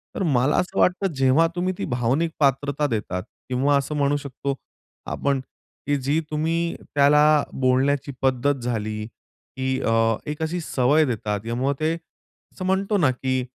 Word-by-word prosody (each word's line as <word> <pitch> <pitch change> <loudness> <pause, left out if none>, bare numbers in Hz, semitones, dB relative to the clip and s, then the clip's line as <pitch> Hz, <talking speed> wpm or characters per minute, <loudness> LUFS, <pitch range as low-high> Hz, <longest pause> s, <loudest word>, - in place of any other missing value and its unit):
तर 195 - -1
मला 135 -2 +2
असं 185 +2 -1
वाटतं 185 0 +2
जेव्हा 135 +4 +4
तुम्ही 185 +1 0
ती - - -3
भावनिक 130 +6 0
पात्रता 140 +1 +1
देतात 100 -6 -3 0.3
किंवा 135 +3 +2
असं 140 +2 -2
म्हणू 145 0 +2
शकतो 140 -1 -4 0.6
आपण 140 -1 0 0.5
की 145 - +2
जी 140 +4 0
तुम्ही 165 +2 0 0.2
त्याला 150 +1 +5
बोलण्याची 135 +2 +1
पद्धत 135 +2 +2
झाली 110 -3 -2
की 130 +3 -6
अ, - - 0 0.4
एक 150 +1 -4
अशी 165 +3 -2
सवय 145 +2 +2
देतात 105 -5 -2
त्यामुळं 125 +5 -1
ते 155 +1 +1 0.6
असं 185 - -6
म्हणतो 195 +2 +1
ना 145 -8 +3
की 130 0 -1
140 Hz, 150 wpm, -23 LUFS, 130-155 Hz, 0.6 s, त्याला